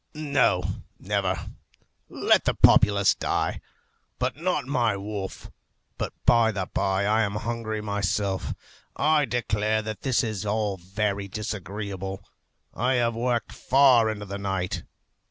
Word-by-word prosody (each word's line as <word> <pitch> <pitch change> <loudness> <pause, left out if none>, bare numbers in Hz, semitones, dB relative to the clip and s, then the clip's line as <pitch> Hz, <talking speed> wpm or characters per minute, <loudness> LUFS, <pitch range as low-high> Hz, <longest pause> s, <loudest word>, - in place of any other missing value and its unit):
No, 140 -11 +2 0.3
never! 95 -2 -2 0.6
Let - - +2
the - - +1
populace 100 -2 +5
die, - - -1 0.6
but 125 +1 -1
not 170 -1 -1
my 120 -6 +1
wolf. 100 -1 -6 0.5
But - - -2
by 115 -2 +5
the 100 -3 -3
bye 95 0 +1
I 110 +2 +3
am 100 -2 -1
hungry 110 0 -3
myself. 100 -1 -1 0.4
I 155 -1 +3
declare 110 -3 0
that 110 -2 -6
this 130 -2 +1
is 110 -5 -3
all 105 -1 -1
very 100 +2 -2
disagreeable. 100 -1 -5 0.5
I 125 +2 +1
have 120 -1 +2
worked 120 +1 -1
far 130 -4 +4
into 105 -1 -4
the 100 0 -6
night. 95 -2 -2
105 Hz, 130 wpm, -26 LUFS, 100-115 Hz, 0.6 s, populace